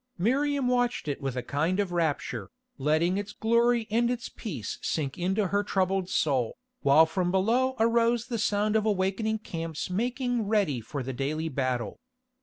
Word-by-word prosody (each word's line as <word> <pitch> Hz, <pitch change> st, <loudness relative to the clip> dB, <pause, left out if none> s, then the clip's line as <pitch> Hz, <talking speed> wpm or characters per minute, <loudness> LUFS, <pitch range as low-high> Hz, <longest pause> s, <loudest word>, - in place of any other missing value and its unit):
Miriam 275 Hz, +7 st, +1 dB
watched 245 Hz, -6 st, +1 dB
it 145 Hz, 0 st, -3 dB
with 135 Hz, -2 st, -3 dB
a 125 Hz, -, -2 dB
kind 160 Hz, +7 st, 0 dB
of 200 Hz, -3 st, 0 dB
rapture, 165 Hz, -4 st, -1 dB, 0.3 s
letting 160 Hz, +7 st, +2 dB
its 205 Hz, +1 st, -6 dB
glory 235 Hz, 0 st, +2 dB
and 235 Hz, +2 st, +2 dB
its 245 Hz, 0 st, -3 dB
peace 150 Hz, -, -6 dB
sink 140 Hz, -5 st, -2 dB
into 190 Hz, +2 st, 0 dB
her 200 Hz, 0 st, +1 dB
troubled 190 Hz, -2 st, 0 dB
soul, 130 Hz, -10 st, 0 dB, 0.2 s
while 145 Hz, +3 st, +6 dB
from 175 Hz, +2 st, -1 dB
below 235 Hz, +8 st, +2 dB
arose 230 Hz, +1 st, +3 dB
the 235 Hz, -3 st, -3 dB
sound 210 Hz, 0 st, +1 dB
of 220 Hz, -, +3 dB
awakening 210 Hz, +2 st, 0 dB
camps 165 Hz, -5 st, -5 dB
making 245 Hz, +2 st, -1 dB
ready 195 Hz, -, +1 dB
for 130 Hz, +5 st, -5 dB
the 130 Hz, +1 st, -4 dB
daily 155 Hz, +5 st, -2 dB
battle. 130 Hz, -6 st, -2 dB
195 Hz, 165 wpm, -28 LUFS, 155-230 Hz, 0.3 s, while